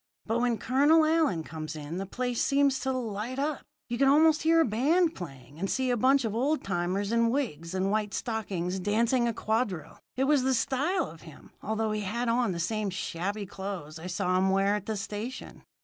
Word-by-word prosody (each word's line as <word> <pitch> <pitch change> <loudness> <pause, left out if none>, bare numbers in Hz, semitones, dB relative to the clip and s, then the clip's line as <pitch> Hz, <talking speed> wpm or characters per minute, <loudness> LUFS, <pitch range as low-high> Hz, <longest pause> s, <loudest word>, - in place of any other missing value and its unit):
But 225 +1 0
when 240 -1 +1
Colonel 290 +7 +4
Allyn 310 - +2
comes 155 0 -6
in, 150 +3 -6
the 195 - -4
place 245 +3 -2
seemed 280 -1 +3
to 265 0 -2
light 235 -1 -3
up. 290 +1 -1 0.3
You 240 0 -3
could 275 - +5
almost 310 +2 +5
hear 330 +1 +4
a - - +4
band 310 - +2
playing, 135 -4 -10
and 195 +2 -2
see 260 -1 0
a - - +2
bunch 260 +2 +3
of 215 - -2
old 275 +7 0
timers 190 +2 -1
in 230 0 +3
wigs 185 - -2
and 190 +1 0
white 210 -1 -1
stockings 190 -6 -2
dancing 235 +5 +2
a - - +1
quadrille. 215 -6 -2 0.2
It 260 - +1
was 285 0 +3
the 260 0 +2
style 290 +8 0
of 165 -7 -11
him, 160 -3 -14
although 220 +1 -1
he 215 0 -1
had 230 +5 -2
on 235 -2 +2
the 170 - -4
same 215 +3 -1
shabby 190 +2 -3
clothes 190 -5 -6
I 170 - -7
saw 185 0 0
him 190 +1 +2
wear 195 +1 +3
at 205 -2 -3
the 220 -1 -2
station. 215 +5 -6
220 Hz, 210 wpm, -28 LUFS, 190-260 Hz, 0.3 s, could